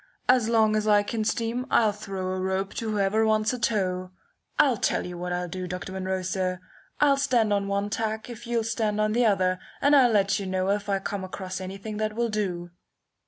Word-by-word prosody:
As 250 -3 +4
long 220 -2 +3
as 215 0 0
I 205 -1 +5
can 220 +1 -2
steam 230 +3 -1
I'll 220 -2 +4
throw 195 -3 -5
a 185 - -3
rope 190 +1 -1
to 225 - -3
whoever 210 +1 +1
wants 215 +1 +2
a 250 - -4
tow. 185 -5 0 0.5
I'll 260 -5 +4
tell - - 0
you 180 0 -6
what 180 +1 -4
I'll 180 0 -2
do, 185 +1 -5
Dr. 180 +1 -6
Munro, 190 0 -2
sir. 185 -1 -1 0.4
I'll 280 -2 +4
stand 245 -6 +2
on 200 -1 0
one 200 +1 -1
tack 220 +1 -2
if 240 -1 -9
you'll 235 -1 0
stand 220 -2 -1
on 215 0 +2
the 240 0 +3
other, 185 -3 +2 0.2
and 285 +1 +4
I'll 260 -3 +6
let 200 -2 +2
you 195 - -4
know 185 +1 0
if 205 0 -2
I 195 - +2
come 195 0 -4
across 185 0 -6
anything 195 +3 -6
that 215 0 -2
will 235 0 0
do." 180 -5 -3
205 Hz, 215 wpm, -26 LUFS, 190-220 Hz, 0.5 s, I'll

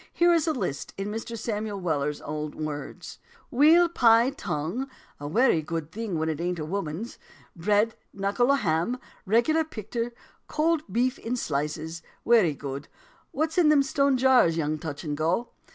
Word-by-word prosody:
Here 345 0 +4
is 330 -3 +2
the 320 - +1
list, 140 - -4
in 195 +1 -3
Mr. 225 +2 -5
Samuel 210 -2 -3
Weller's 150 -4 -1
own 150 +1 -4
words: 145 -1 -7 0.3
"Weal 320 +7 +6
pie, 235 -5 +4
tongue: 220 - -3 0.3
a 145 - -5
wery 215 - +3
good 160 0 -4
thing 215 -5 -3
when 160 0 -1
it 160 0 -2
ain't 175 0 -1
a 155 - -4
woman's: 185 +4 -4 0.4
bread, 210 +6 +2 0.2
knuckle 200 +6 +1
o' - - +5
ham, 170 - 0 0.3
reg'lar 240 +10 +3
picter, 235 -4 -4 0.4
cold 320 0 +1
beef 250 +5 +1
in 235 +2 -3
slices; 155 - -3 0.2
wery 215 -11 +4
good. 140 0 -6 0.4
What's 315 +4 -1
in 320 -4 +5
them 295 -2 +5
stone 275 -1 +2
jars, 250 -10 +4
young 155 -1 -1
touch 145 -2 -6
and 150 -3 -3
go?" 165 +10 0
205 Hz, 165 wpm, -26 LUFS, 155-255 Hz, 0.4 s, Weal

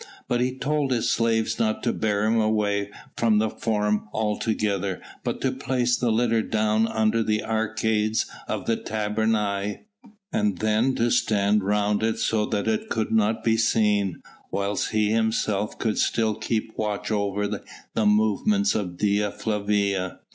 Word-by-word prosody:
But 120 0 +1
he 130 +1 -1
told 145 +1 0
his 120 -3 +1
slaves 115 -1 +1
not 110 -1 0
to - - +1
bear 105 -1 0
him 115 +1 +2
away 105 -2 0 0.3
from 115 -2 +3
the 110 0 +1
Forum 105 -2 -1
altogether 105 -3 -1 0.2
but - - -3
to 135 - +1
place 130 -2 0
the 120 0 0
litter 115 0 +2
down 110 0 +1
under 110 0 +1
the 105 -1 0
arcades 110 0 0 0.2
of - - -3
the 115 - +1
tabernae, 105 -1 -1 0.5
and 210 -1 +1
then 110 +4 +1
to 120 +1 +1
stand 105 -3 +2
round 105 +1 +1
it 110 0 0
so 110 -2 0
that 105 -1 -2
it 110 -1 -1
could 110 -1 -1
not 110 0 +2
be 115 -1 +2
seen, 105 -5 +1 0.3
whilst 100 0 -1
he 110 -1 +1
himself 110 -2 0
could 110 -2 -1
still 110 -2 +1
keep 110 +1 -3
watch 105 0 -2
over 105 -1 0
the 105 +1 -5
movements 110 - +2
of 90 -5 -3
Dea 105 +1 +1
Flavia. 100 -3 -1
110 Hz, 155 wpm, -25 LUFS, 105-115 Hz, 0.5 s, from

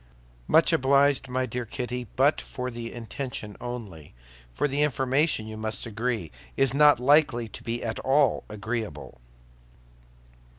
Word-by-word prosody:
"Much - - +4
obliged, 140 +1 +3
my 130 +1 0
dear 125 +1 -4
Kitty; 125 +1 -5
but 140 +4 +3
for 125 0 -5
the 115 -1 -6
intention 115 -2 -6
only—for 75 - -6
the 140 +1 -1
information, 135 -2 +1
you 110 0 -7
must 110 +2 -3
agree, 115 -5 -3 0.3
is 135 -2 +2
not 150 -1 +6
likely 130 -3 +3
to 105 - -10
be 120 +1 -4
at 115 -1 -3
all 135 0 +2
agreeable." 105 - -5
120 Hz, 130 wpm, -26 LUFS, 110-135 Hz, 0.3 s, not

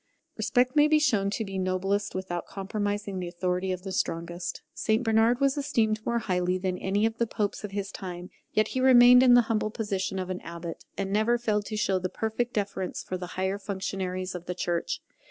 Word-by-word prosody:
Respect 250 +1 +1
may 295 0 +6
be 310 0 +5
shown 215 -10 +2
to 220 +2 -2
be 195 -1 -4
noblest 190 +2 -1
without 185 -2 -4
compromising 205 0 -3
the 180 - -4
authority 180 +1 -1
of 180 0 -4
the 195 - -5
strongest. 170 -1 -3
St 220 +2 +1
Bernard 225 +2 +3
was 275 0 +2
esteemed 225 -7 +1
more 235 +1 0
highly 180 -4 0
than 185 -1 -2
any 200 +3 +1
of 225 0 -2
the 235 - +2
Popes 210 -1 -2
of 210 - -4
his 195 0 -4
time; 180 -1 -7 0.2
yet 215 0 +2
he 260 - -1
remained 250 -1 +8
in 250 -1 +7
the 245 - +8
humble 220 -1 0
position 200 -3 -2
of 185 0 -3
an 185 - -4
abbot, 170 0 -7
and 195 0 -2
never 220 +3 +3
failed 215 -3 0
to 215 - -4
show 195 -3 +1
the 185 0 -2
most - - -27
perfect 225 +2 -1
deference 195 -3 -2
for 185 - -4
the 180 -1 -5
higher 190 +2 0
functionaries 190 -2 -3
of 180 -1 -7
the 180 - -3
Church. 175 -1 -2
200 Hz, 210 wpm, -28 LUFS, 185-225 Hz, 0.2 s, remained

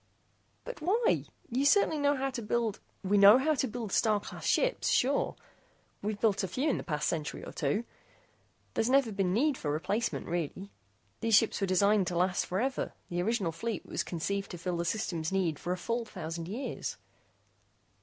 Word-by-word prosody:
"But - - -7
why? 440 +9 +2 0.2
You 255 +3 0
certainly 315 0 +4
know 285 0 +3
how 270 0 -1
to 255 -2 -4
build 220 -1 -1
" - - -39
"We 200 +1 +3
know 200 +4 +9
how 300 +4 +2
to 270 -2 0
build 230 -3 -5
Star 215 -1 +3
Class - - -7
ships, - - +2
sure. 275 +3 +2 0.7
We've 205 0 -3
built 210 -3 +2
a - - 0
few 265 - -1
in - - -1
the - - -5
past 150 -2 -1
century 155 -3 -3
or - - -7
two. 145 +11 -1 0.9
There's 225 - +1
never 265 -3 +4
been 195 -3 0
need 270 +8 +2
for 150 - -3
replacement, 190 +10 -1
really. 175 +3 -3 0.5
These 225 -2 +3
ships 205 - +3
are 195 - +1
designed 200 +1 +3
to 175 - -1
last 180 +1 +1
forever. 245 +9 -1 0.2
The 175 0 0
original 200 -3 0
fleet 225 +7 -4
was - - -2
conceived 195 +4 -3
to 175 - -6
fill 175 +1 -3
the 170 - -1
System's 170 -4 -2
needs 180 -6 0
for 175 - -3
a 180 - 0
full 230 +6 -2
thousand 165 -6 -6
years." 240 +6 -4
205 Hz, 190 wpm, -30 LUFS, 180-250 Hz, 0.9 s, know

